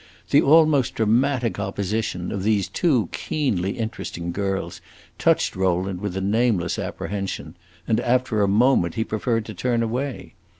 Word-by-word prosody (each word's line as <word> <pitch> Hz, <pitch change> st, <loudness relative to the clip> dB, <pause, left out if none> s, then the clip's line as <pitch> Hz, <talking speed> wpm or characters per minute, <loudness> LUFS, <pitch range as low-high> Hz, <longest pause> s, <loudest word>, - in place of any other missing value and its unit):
The 145 Hz, -, +6 dB
almost 150 Hz, -4 st, +4 dB
dramatic 120 Hz, +1 st, +1 dB
opposition 100 Hz, -1 st, -2 dB
of 100 Hz, -, -3 dB
these 100 Hz, -1 st, +1 dB
two 130 Hz, -, +1 dB
keenly 100 Hz, -, -1 dB
interesting 110 Hz, -6 st, -4 dB
girls 95 Hz, +1 st, -3 dB, 0.4 s
touched -, -, +2 dB
Rowland 95 Hz, 0 st, 0 dB
with 100 Hz, -3 st, -3 dB
a -, -, -1 dB
nameless 100 Hz, -3 st, +1 dB
apprehension, 95 Hz, -6 st, -4 dB, 0.3 s
and 110 Hz, -, +2 dB
after 125 Hz, -3 st, +1 dB
a 100 Hz, -, +3 dB
moment 100 Hz, -5 st, +3 dB
he 110 Hz, -, 0 dB
preferred 115 Hz, +1 st, -1 dB
to 110 Hz, -, -7 dB
turn 120 Hz, +4 st, 0 dB
away. 125 Hz, +4 st, -4 dB
110 Hz, 140 wpm, -23 LUFS, 95-125 Hz, 0.4 s, The